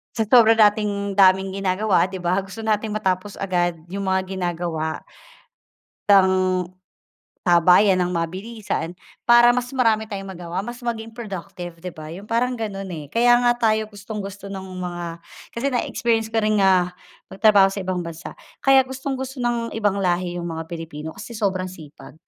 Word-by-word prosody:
Sa 225 - +1
sobra 225 0 +6
nating 205 -2 +2
daming 190 -1 +4
ginagawa, 190 0 +2
'di 190 -1 -7
ba, 180 +2 +2
gusto 195 +3 -8
nating 215 0 0
matapos 190 -1 -1
agad 175 -3 0 0.2
'yung 195 0 -4
mga 190 0 +1
ginagawa. 170 -4 -3 1.1
Tang 185 -2 +4 0.8
sabayan 180 +3 +5
nang 180 0 0
mabilisan, 185 +1 -3 0.3
para 240 0 +7
mas 245 0 -2
marami 225 -4 +2
tayong 195 -2 -6
magawa, 175 +1 -4
mas 240 +4 -7
maging 230 -2 -4
productive, 180 -6 -7
'di 180 - -5
ba, 155 -2 -10
'yung 200 +4 -11
parang 245 +2 +1
gano'n, 210 -5 -4
eh. 155 -3 -6
Kaya 240 +7 +4
nga 240 0 +4
tayo 220 -2 +1
gustong-gusto 200 -1 -7
no'ng 190 -1 -7
mga 175 -1 -4 0.5
kasi 265 +3 -2
na-experience 230 -2 0
ko 225 - -2
ring, 215 -1 +2
ah, 185 -2 +3 0.4
magtrabaho 200 0 +5
sa 195 +1 -5
ibang 185 -1 -2
bansa. 165 -1 -8 0.3
Kaya 270 -1 +5
gustong-gusto 265 0 -5
ng 240 -1 -1
ibang 205 -3 0
lahi 175 -1 0
'yung 175 - -4
mga 160 0 -6
Pilipino, 160 -2 -7
kasi 210 +4 -8
sobrang 190 -4 -1
sipag. 155 -5 -13
195 Hz, 155 wpm, -22 LUFS, 180-225 Hz, 1.1 s, para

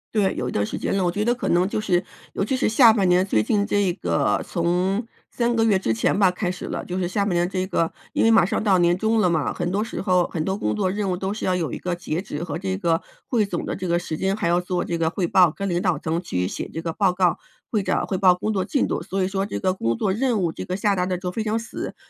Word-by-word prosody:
对， 200 -3 +2
有 125 - -2
一 - - -5
段 105 - 0
时 - - -5
间 - - -1
了， 185 - +1
我 - - +2
觉 205 +3 -1
得 240 +2 +2
可 250 - -4
能 175 +2 +3
就 210 - -2
是 185 -4 +1 0.3
尤 - - -1
其 260 +5 0
是 - - +1
下 225 +1 +7
半 200 -4 +2
年 180 +1 +4
最 110 - +2
近 205 - +1
这 200 -4 +1
个 - - 0
从 185 +5 0 0.2
3 235 0 0
个 225 - +3
月 205 -4 +3
之 115 - 0
前 110 - +1
吧 195 -3 +5
开 180 0 -2
始 185 - -7
了， - - -4
就 180 +1 -4
是 175 - 0
下 200 +2 0
半 195 - 0
年 175 0 +2
这 185 -1 -1
个 165 -3 0 0.2
因 - - +1
为 225 - +5
马 225 -6 +6
上 195 - -1
到 200 -4 +3
年 175 0 +3
终 220 +3 +1
了 180 - +3
嘛， 160 -4 0
很 175 - -2
多 200 +2 0
时 225 - -4
候， 180 -2 +2
很 160 -2 -3
多 190 +3 -1
工 - - -1
作 190 -3 0
任 200 -1 -2
务 180 - 0
都 190 +2 -3
是 215 - -4
要 185 - +1
有 170 -3 -2
一 - - -4
个 180 -1 -3
截 175 0 -3
止 160 -4 -5
和 160 -2 -4
这 190 +1 -2
个 170 -2 +1 0.3
汇 225 -5 +2
总 175 -4 -4
的 - - -3
这 185 -1 -4
个 170 - +2
时 160 -3 -4
间， 195 +1 0
还 170 -5 -1
要 175 +1 +3
做 180 0 -2
这 170 - -2
个 160 -1 +1
汇 185 +1 -1
报， 180 0 +5
跟 200 +5 -4
领 175 0 0
导 180 -4 +1
层 160 +4 -2
去 90 - -2
写 - - -4
这 165 - -4
个 165 -1 -3
报 190 0 +1
告， 180 -2 +2 0.3
会 215 -3 +1
长 - - 0
汇 190 - -2
报 185 -2 +5
工 215 +4 -2
作 190 -3 -1
进 275 +4 +1
度， - - -1
所 195 0 -2
以 185 - 0
说 195 0 -1
这 - - -5
个 185 -1 +1
工 115 -10 -1
作 200 -3 0
任 230 -1 0
务 170 -2 0
这 - - -7
个 180 - -3
下 200 +1 +1
达 180 -1 0
得 185 -1 -1
就 180 0 -4
非 220 - -3
常 215 +1 0
死， 230 - -6
185 Hz, 325 characters per minute, -23 LUFS, 175-205 Hz, 0.3 s, 下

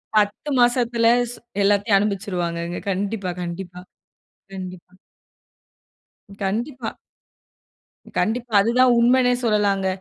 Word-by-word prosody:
10 210 +7 +1
மாசத்துல 240 -1 +3 0.2
ஸ் - - -8 0.3
எல்லாத்தையும் 200 +1 +3
அனுபவிச்சிருவாங்கக. 175 -4 -3
கண்டிப்பா, 195 0 -2
கண்டிப்பா, 175 +1 -6 0.8
கண்டிப்பா. 185 -1 -8 1.5
கண்டிப்பா. 235 +5 -3 1.2
கண்டிப்பா! 235 +1 -1
அது 230 - +1
தான் 255 -1 +6
உண்மைனே 250 +1 +4
சொல்லலாங்க. 205 -3 +1
205 Hz, 85 wpm, -22 LUFS, 190-235 Hz, 1.5 s, தான்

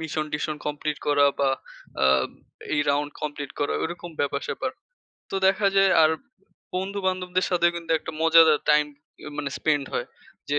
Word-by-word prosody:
মিশন-টিশন 155 -1 -3
complete 150 0 -2
করা 145 -1 +4
বা 140 -1 +3 0.5
আ - - +6 0.7
এই 150 - +2
রাউন্ড 145 +1 0
কমপ্লিট 145 -2 -4
করা, 145 - 0
ওরকম 175 +1 -5
ব্যাপার-স্যাপার। 145 - -2 0.6
তো 195 - -2
দেখা 195 +1 +3
যায় 195 0 +5
আর, 155 - +5 0.7
বন্ধু-বান্ধবদের 185 -1 -1
সাথেও 175 -1 +3
কিন্তু 170 -1 -7
একটা 160 - -7
মজাদার 165 -2 +6
টাইম 150 0 +4 0.4
ই - - -10
মানে 140 - -2
স্পেন্ড 145 -3 +1
হয়। 120 - -1 0.4
যে 145 - +2
155 Hz, 145 wpm, -25 LUFS, 145-180 Hz, 0.7 s, আ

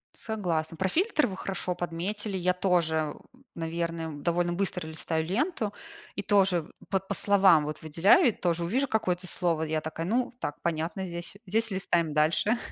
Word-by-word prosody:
Согласна. 170 -7 -2
Про 190 +2 +1
фильтр 355 - +2
вы 190 - -5
хорошо 185 -1 -3
подметили. 190 +4 -3
Я 180 0 +2
тоже, 170 -4 +1 0.2
ум 260 +2 -22
наверное, 165 0 -3
довольно 170 +4 0
быстро 180 -2 -2
листаю 160 0 -2
ленту 220 - -1 0.4
и - - -2
тоже 195 -5 +2 0.2
по 195 -1 +2
по 195 +1 -5
словам 190 -6 +5
вот 150 +1 -5
выделяю 170 - +5
и - - +1
тоже 175 -4 -1
увижу 255 +11 +1
какое-то 185 -5 0
слово. 170 -3 0
Я 155 0 -1
такая: 160 +1 -4
"Ну 240 +7 0
так, 145 - -4
понятно 165 +3 -2
здесь. 170 +2 -5
Здесь 225 +3 +1
листаем 170 -4 0
дальше". 160 +9 +2
180 Hz, 165 wpm, -28 LUFS, 165-200 Hz, 0.4 s, словам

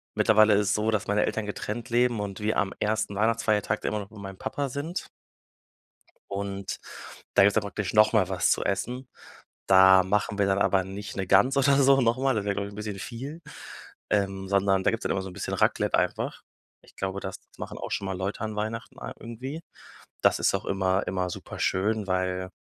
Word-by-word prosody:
mittlerweile 110 0 +5
ist 100 -1 +2
es - - +3
so, 105 +1 0
dass 110 -3 -1
meine 105 +1 +2
Eltern 110 - -2
getrennt 105 +3 -5
leben 120 -1 +2
und 100 -2 -5
wir 105 +1 0
am 100 -1 0
1. 110 -1 -1
Weihnachtfeiertag 110 -1 +1
dann - - -2
immer 105 - -1
noch 100 - -10
bei 110 - -13
meinem 95 -1 -8
Papa 140 -1 -3
sind. 145 +7 -4 1.2
Und 100 0 -4 0.6
da 100 - +6
gibt's 100 - +5
dann 110 - +2
praktisch 100 -1 -4
noch 110 +1 +5
mal 100 -5 +3
was 95 -2 +2
zu - - +1
Essen. 125 +7 -2 0.6
Da 95 0 +7
machen 100 +2 0
wir 100 - +4
dann 95 0 +2
aber 95 -1 +3
nicht 100 +2 -7
'ne 95 -1 -2
Gans 100 +9 +4
oder 140 0 +4
so 135 0 +5
noch 120 0 +2
mal, 135 -1 +1
das 105 -2 -1
wäre, 100 -1 0
glaube 100 0 -2
ich, 100 - -10
'n - - -11
bisschen 105 -2 -5
viel, 130 - -7 0.7
ähm, 95 -2 0
sondern 100 -1 +2
da - - +3
gibt's 115 0 -3
dann - - -1
immer 95 - 0
so 95 - -6
'n - - -11
bisschen - - -4
Raclette - - +2
einfach. - - -1 0.4
Ich - - -21
glaube, 95 0 -3
das 95 - -5 0.2
machen - - -7
auch - - -6
schon 100 - -2
mal 95 -1 -3
Leute 95 +3 -3
an 110 -1 -3
Weihnachten 110 +2 -4
a - - -6
irgendwie. 130 +7 -7 0.6
Das - - +3
ist - - +2
auch - - -4
immer 95 0 0
immer 90 0 -1
super - - -8
schön, 105 +2 0
weil 95 0 -1
105 Hz, 215 wpm, -27 LUFS, 95-110 Hz, 1.2 s, Da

